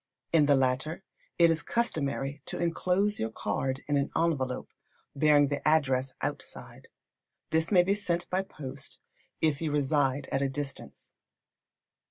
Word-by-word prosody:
In 155 -3 +5
the 145 - +6
latter, 135 +7 0 0.3
it 170 -1 +6
is 165 - 0
customary 145 - -1
to - - -1
enclose 180 +4 +1
your 110 - -1
card 130 +3 -2
in 145 -1 +2
an 140 - 0
envelope, 145 -6 0 0.5
bearing 145 -1 +4
the 145 - -2
address 135 -4 +2
outside. - - -6 0.6
This 160 +3 +1
may 180 -3 +6
be 195 +2 +2
sent 175 -4 -1
by 185 +1 +2
post, 140 -7 -9 0.4
if 155 -2 +1
you 160 -2 -1
reside 140 -1 +1
at 135 - +1
a 140 - +1
distance. 140 0 -7
145 Hz, 145 wpm, -29 LUFS, 135-165 Hz, 0.6 s, the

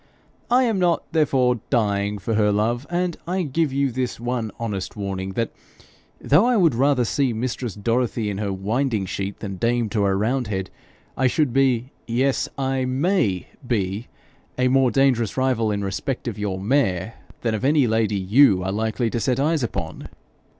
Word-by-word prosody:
'I 250 +2 +4
am 225 -5 +1
not, 175 -2 +2
therefore, 130 -6 +2
dying 105 -4 +1
for 100 +4 -3
her 105 -1 +3
love; 115 +6 0
and 175 -1 -1
I 185 +1 0
give 155 0 0
you 135 0 +1
this 125 -1 -3
one 120 -2 -2
honest 105 -5 -4
warning 95 -2 -4
that, 115 +3 -1 0.7
though 150 +8 +4
I 250 -2 +3
would 170 -8 +4
rather 130 0 +2
see 130 +1 0
mistress 120 0 -3
Dorothy 115 +1 0
in 100 -1 -3
her 100 -2 -1
winding 110 +3 -1
sheet 100 +1 -4
than 95 -3 -5
dame 115 +1 +1
to 105 -2 0
a 95 - +2
roundhead, 105 -3 -1 0.4
I 130 - +2
should 140 -1 +1
be 130 -1 +2 0.2
yes, 130 +3 +1
I 135 -1 0
MAY 130 - 0 0.2
be 105 -1 -1 0.5
a 125 0 +2
more 130 -1 +4
dangerous 125 -5 +2
rival 130 -4 +1
in 100 -1 -1
respect 110 +7 -3
of 110 -3 -4
your 100 -2 -2
mare, 100 -3 0 0.3
than 115 -2 0
of 110 - -3
any 145 0 +4
lady 110 -2 +1
YOU 100 0 +4
are 95 - -1
likely 110 +2 -1
to 120 - -1
set 125 +3 0
eyes 155 +2 +1
upon.' 120 - -4
120 Hz, 175 wpm, -23 LUFS, 105-135 Hz, 0.7 s, I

